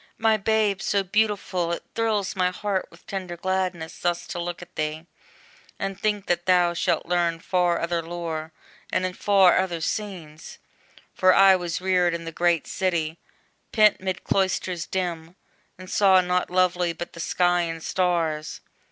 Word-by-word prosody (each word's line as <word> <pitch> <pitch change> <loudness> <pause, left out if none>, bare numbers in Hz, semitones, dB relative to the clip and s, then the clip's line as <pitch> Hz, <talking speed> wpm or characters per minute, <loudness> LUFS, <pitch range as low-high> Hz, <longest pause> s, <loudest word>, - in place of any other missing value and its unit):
My 225 -1 +3
babe 215 -2 +1
so 200 -2 +1
beautiful! 195 -3 0
it - - -5
thrills 215 -4 0
my 180 -1 +2
heart 190 +1 -2
With 170 - -19
tender 185 -3 -5
gladness, 185 -2 -2
thus 175 0 -1
to 175 - -4
look 175 0 -5
at 175 +1 -18
thee, 155 +1 -3 0.7
And 195 0 -4
think 210 -2 0
that 175 0 -1
thou 180 -1 +4
shalt 170 - 0
learn 170 -1 +1
far 180 -1 +1
other 170 0 -1
lore, 165 -1 -5 0.4
And 185 - +1
in 185 - -3
far 195 -2 +4
other 180 -3 -1
scenes! 165 -4 -5 0.6
For 185 -1 +4
I 195 -1 +7
was 175 -1 -3
reared 180 -2 +2
In 165 0 -6
the 165 - -5
great 170 -1 +1
city, 170 -3 -2 0.5
pent 215 -3 +4
'mid 185 -1 -3
cloisters 185 -3 -1
dim, 175 -2 -3 0.4
And 185 0 -11
saw 190 -1 +5
nought 180 0 0
lovely 180 -1 +1
but 175 +1 -7
the 170 - -11
sky 175 +1 +2
and 165 -1 -4
stars. 165 -4 -1
180 Hz, 160 wpm, -24 LUFS, 170-190 Hz, 0.7 s, I